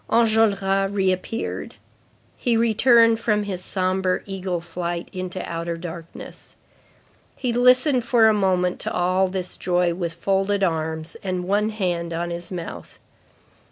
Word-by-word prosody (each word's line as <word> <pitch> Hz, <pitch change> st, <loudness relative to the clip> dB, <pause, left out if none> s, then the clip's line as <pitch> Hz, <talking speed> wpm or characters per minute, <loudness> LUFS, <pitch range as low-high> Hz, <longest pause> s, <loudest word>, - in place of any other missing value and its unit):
Enjolras 205 Hz, -4 st, +2 dB
reappeared. 195 Hz, +3 st, -2 dB, 0.6 s
He 235 Hz, -2 st, +1 dB
returned 230 Hz, 0 st, +4 dB
from 210 Hz, -3 st, +1 dB
his 185 Hz, -3 st, -5 dB
sombre 185 Hz, -1 st, 0 dB
eagle 190 Hz, -2 st, -3 dB
flight 170 Hz, 0 st, -4 dB
into 185 Hz, 0 st, -5 dB
outer 170 Hz, 0 st, -3 dB
darkness. 165 Hz, -1 st, -9 dB, 0.8 s
He 250 Hz, -3 st, -2 dB
listened 250 Hz, +2 st, +4 dB
for 230 Hz, -1 st, +4 dB
a 220 Hz, -, +5 dB
moment 185 Hz, -3 st, +1 dB
to -, -, -4 dB
all 185 Hz, +2 st, +2 dB
this 185 Hz, -1 st, -4 dB
joy 175 Hz, -1 st, +1 dB
with 170 Hz, -1 st, -4 dB
folded 195 Hz, +2 st, 0 dB
arms, 160 Hz, -2 st, -2 dB
and 185 Hz, -2 st, -2 dB
one 205 Hz, +2 st, +2 dB
hand 175 Hz, -5 st, -2 dB
on 170 Hz, +1 st, -3 dB
his 170 Hz, +1 st, -6 dB
mouth. 175 Hz, -3 st, -7 dB
185 Hz, 130 wpm, -23 LUFS, 175-210 Hz, 0.8 s, a